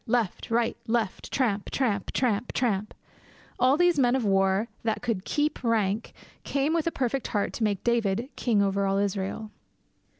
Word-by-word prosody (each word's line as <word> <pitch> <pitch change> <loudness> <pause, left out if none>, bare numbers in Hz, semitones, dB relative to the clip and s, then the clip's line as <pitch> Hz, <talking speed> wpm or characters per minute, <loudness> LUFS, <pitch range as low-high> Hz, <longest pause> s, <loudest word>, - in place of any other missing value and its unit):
Left! 230 -5 0
Right! 230 0 +1
Left! 225 -4 -1
Tramp! 215 -7 0
tramp! 215 -7 -1
tramp! 235 -2 0
tramp! 215 -4 -1 0.6
All 255 +3 +4
these 350 -3 +3
men 250 -1 +4
of 255 -4 0
war 195 +2 +2
that 225 +1 -2
could 225 -6 -2
keep 295 -2 -1
rank 220 -2 0 0.3
came 280 +3 0
with 335 -1 0
a - - +2
perfect 265 -1 -1
heart 205 -2 -1
to 230 - -3
make 205 -3 0
David 235 -1 +1
king 215 -5 +2
over 200 0 +1
all 195 0 +1
Israel. 200 +2 -2
225 Hz, 165 wpm, -27 LUFS, 200-250 Hz, 0.6 s, All